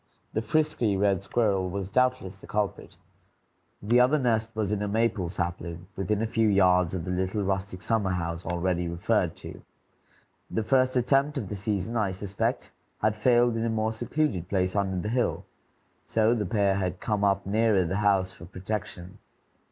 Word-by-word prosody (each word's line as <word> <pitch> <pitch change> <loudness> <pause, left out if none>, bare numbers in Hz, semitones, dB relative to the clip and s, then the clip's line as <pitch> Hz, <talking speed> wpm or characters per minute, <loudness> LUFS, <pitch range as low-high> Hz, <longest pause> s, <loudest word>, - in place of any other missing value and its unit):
The 110 - 0
frisky 120 -4 +1
red 100 -1 +2
squirrel 100 -3 0
was 95 0 -4
doubtless 125 -3 +1
the 95 - -15
culprit. 105 -1 -3 0.9
The 120 +4 +4
other 130 +5 +4
nest 115 -4 +1
was 105 -2 -1
in 105 -1 -1
a 105 - -1
maple 105 -4 0
sapling, 85 -1 -4
within 100 +3 -1
a - - +1
few 115 0 +1
yards 90 -3 +3
of 85 -3 -4
the 90 - -3
little 95 +3 -1
rustic 95 -1 -3
summer 110 -4 +1
house 85 -1 -3
already 90 0 -1
referred 85 +1 0
to. - - -10 0.9
The 110 - -1
first 130 +3 +2
attempt 135 +4 +2
of 105 -8 -4
the 105 - -4
season, 100 +2 -2
I 105 -3 +1
suspect, 95 +1 -3 0.3
had 110 0 +2
failed 120 +1 +3
in 115 - -1
a 115 - 0
more 110 0 0
secluded 115 - -1
place 95 -1 0
under 95 -2 0
the 105 - -3
hill; 125 -1 0 0.6
so 110 +1 +3
the 105 -5 -1
pair 100 -1 +2
had 90 -1 -2
come 105 -2 -1
up 100 -1 +2
nearer 105 -2 +2
the 95 +4 -2
house 100 -3 +2
for 85 - -12
protection. 95 0 -6
100 Hz, 175 wpm, -27 LUFS, 95-115 Hz, 0.9 s, The